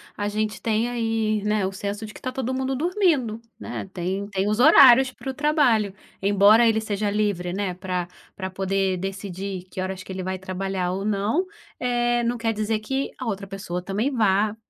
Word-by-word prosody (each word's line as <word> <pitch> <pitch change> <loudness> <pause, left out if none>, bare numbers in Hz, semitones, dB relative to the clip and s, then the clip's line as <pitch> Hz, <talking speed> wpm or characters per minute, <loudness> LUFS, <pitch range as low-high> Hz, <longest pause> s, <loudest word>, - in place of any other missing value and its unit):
a 205 - -2
gente 215 +1 -2
tem 225 +1 +1
aí, 225 -3 0
né, 210 -1 +1
o 190 - -2
senso 200 +2 -4
de 215 - -10
que - - -13
tá 255 - -3
todo 260 -1 -3
mundo 265 +1 -1
dormindo, 300 - +1 0.2
né. 225 -4 -6
Tem 190 +3 -3
tem 195 -1 -1
os 215 +2 0
horários 260 +1 +8
para 265 - -8
o - - -9
trabalho. 260 -9 +2 0.3
Embora 205 +4 +5
ele 220 -1 +3
seja 210 -1 -1
livre, 200 -4 -1
né, 190 0 -2
pra 180 -1 -3 0.3
pra 190 -1 -4
poder 190 0 0
decidir 190 0 -5
que 185 - -4
horas 185 0 -4
que - - -10
ele 190 0 -4
vai 185 0 -3
trabalhar 185 -1 -3
ou 190 +2 -3
não, 210 - 0 0.3
eh, 240 -1 +1
não 235 +1 0
quer 225 -1 0
dizer 215 +1 -1
que 265 +6 -2
a 255 - -6
outra 200 -3 -3
pessoa 190 -2 -5
também 205 +9 -1
vá 210 -3 +2
210 Hz, 195 wpm, -24 LUFS, 190-235 Hz, 0.3 s, horários